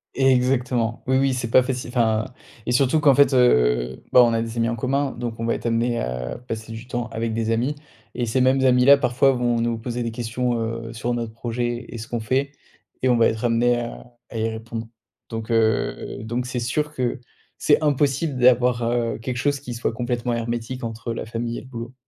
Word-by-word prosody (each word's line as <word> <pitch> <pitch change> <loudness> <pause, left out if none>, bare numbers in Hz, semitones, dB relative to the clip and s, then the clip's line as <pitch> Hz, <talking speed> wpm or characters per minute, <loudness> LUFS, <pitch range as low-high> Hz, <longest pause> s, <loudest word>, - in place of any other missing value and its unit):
Exactement. 125 -3 +1
Oui, 130 0 +3
oui, 135 -1 +2
c'est 125 -2 -3
pas 130 - +7
facile, 125 -1 -3
enfin 110 -2 +2 0.4
et - - -1
surtout 135 +4 +3
qu'en 145 -2 +5
fait, 140 0 +4
heu, 60 - +3
bah 125 - +8
on 115 -1 +3
a 115 - +1
des 115 0 -5
amis 115 0 +1
en 115 - -1
commun, 135 +3 0
donc 120 -1 -5
on 115 - -2
va 115 - +1
être - - -4
amené 120 +1 +1
à 60 0 -4
passer 110 0 -5
du 115 +2 -8
temps 120 -1 -3
avec 115 0 -3
des 115 0 -1
amis, 125 +6 0 0.4
et 120 - -1
ces 120 +3 0
mêmes 130 +1 +3
amis-là 125 +2 +6
parfois, 135 0 +3
vont 120 -1 0
nous 115 -1 0
poser 120 +1 -4
des 115 - -3
questions, 120 +1 -2
heu, 115 0 -4
sur 120 +2 -2
notre 115 -2 -4
projet 120 +1 -3
et 120 - -7
ce 110 - -7
qu'on 120 - -3
fait 130 +6 0 0.5
et 130 - +3
on 120 - +4
va 115 - +5
être 110 +1 -3
amenés 120 +1 +2
à 120 +1 -8 0.2
à 115 - -6
y 110 +1 0
répondre. 115 0 -6 0.4
Donc, 115 0 -5
heu, 110 -2 0
donc 120 +3 -3
c'est 125 -1 -3
sûr 150 +5 -1
que 125 -4 -2 0.4
c'est 145 +1 +3
impossible 145 0 +1
d'avoir, 125 -1 +4
heu, 120 -1 0
quelque 120 +2 -4
chose 145 +2 0
qui 125 -4 -6
soit 115 0 -2
complètement 120 +1 -2
hermétique 120 +2 -3
entre 115 +1 -4
la 115 - -5
famille 115 +1 -4
et - - -11
le - - -14
boulot. 120 -1 -7
120 Hz, 215 wpm, -23 LUFS, 115-125 Hz, 0.5 s, bah